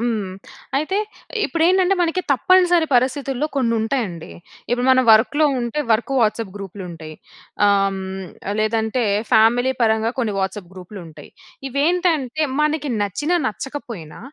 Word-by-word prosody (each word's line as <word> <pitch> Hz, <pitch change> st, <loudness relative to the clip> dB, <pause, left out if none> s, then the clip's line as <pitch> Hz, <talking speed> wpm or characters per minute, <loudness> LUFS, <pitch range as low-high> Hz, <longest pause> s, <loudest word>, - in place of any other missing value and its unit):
హ్మ్. 220 Hz, -5 st, -2 dB, 0.5 s
అయితే 310 Hz, +7 st, -1 dB, 0.5 s
ఇప్పుడేంటంటే 360 Hz, +3 st, +2 dB
మనకి 350 Hz, +2 st, 0 dB
తప్పనిసరి 350 Hz, +3 st, +3 dB
పరిస్థితుల్లో 265 Hz, +2 st, 0 dB
కొన్ని 235 Hz, -4 st, +1 dB
ఉంటాయండి. 220 Hz, -9 st, -3 dB, 0.4 s
ఇప్పుడు 245 Hz, +1 st, 0 dB
మనం 260 Hz, 0 st, +5 dB
వర్క్‌లో 245 Hz, +8 st, +4 dB, 0.2 s
ఉంటే 240 Hz, +5 st, -2 dB
వర్క్ 235 Hz, +5 st, 0 dB
వాట్సాప్ 220 Hz, -2 st, 0 dB
గ్రూపులుంటాయి. 175 Hz, -5 st, -8 dB, 0.5 s
ఆహ్, -, -, +5 dB, 0.2 s
హ్మ్. 190 Hz, -1 st, -6 dB, 0.3 s
లేదంటే 220 Hz, +2 st, 0 dB, 0.3 s
ఫ్యామిలీ 240 Hz, +4 st, +4 dB
పరంగా 220 Hz, 0 st, +2 dB
కొన్ని 220 Hz, -4 st, -1 dB
వాట్సాప్ 190 Hz, -1 st, -3 dB
గ్రూపులుంటాయి. 175 Hz, -5 st, -11 dB, 0.4 s
ఇవేంటంటే 310 Hz, -1 st, 0 dB, 0.2 s
మనకి 300 Hz, -1 st, 0 dB
నచ్చిన, 205 Hz, -, -3 dB, 0.2 s
నచ్చకపోయినా 225 Hz, -, -6 dB
240 Hz, 115 wpm, -20 LUFS, 205-295 Hz, 0.5 s, మనం